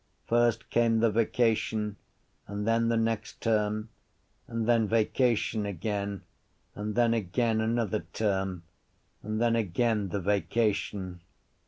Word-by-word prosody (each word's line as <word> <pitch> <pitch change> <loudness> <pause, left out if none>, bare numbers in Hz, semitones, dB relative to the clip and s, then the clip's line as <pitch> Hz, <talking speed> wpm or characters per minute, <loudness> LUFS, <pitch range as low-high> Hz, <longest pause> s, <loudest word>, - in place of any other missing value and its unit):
First 120 -1 +1
came 115 -1 +3
the 115 -1 +3
vacation 110 -1 +1 0.5
and 105 +1 -4
then 115 0 +2
the 115 - +2
next 115 -1 -1
term 110 -1 0 0.6
and 115 -1 -2
then 115 -2 +3
vacation 115 0 +1
again 100 +1 -3 0.5
and 105 +1 -4
then 120 -1 +4
again 110 +2 0
another 110 -1 -1
term 95 -4 -1 0.6
and 110 +1 -3
then 115 0 +3
again 110 0 0
the 100 - -2
vacation. 100 -2 -1
110 Hz, 120 wpm, -29 LUFS, 105-115 Hz, 0.6 s, then